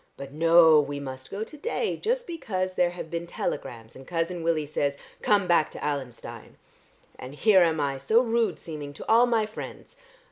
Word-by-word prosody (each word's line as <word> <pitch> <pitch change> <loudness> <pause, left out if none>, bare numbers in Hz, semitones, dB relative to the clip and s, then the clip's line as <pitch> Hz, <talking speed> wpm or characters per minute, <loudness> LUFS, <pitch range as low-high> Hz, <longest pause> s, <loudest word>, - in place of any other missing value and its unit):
But 140 0 -8
no, 165 0 +6
we 145 -1 -2
must 130 -1 -8
go 200 +2 -4
to 300 +7 -11
day 455 +6 -2
just 485 +2 -1
because 190 - -3
there 180 -1 +2
have 175 -2 -8
been 170 0 -4
telegrams, 120 -9 -5
and 130 0 -13
Cousin 170 0 -2
Willie 165 -2 0
says, 140 -1 -1 0.2
'Come 205 -2 +3
back 170 -3 +3
to - - -11
Allenstein.' 140 -5 -6 0.6
And 130 +3 -9
here 195 +3 +5
am 165 -2 +2
I 140 -2 -1
so 220 - +3
rude 230 -2 0
seeming 150 -3 -7
to - - -10
all 235 +2 +5
my 230 -3 +2
friends. 215 +1 -9
165 Hz, 185 wpm, -26 LUFS, 145-210 Hz, 0.6 s, no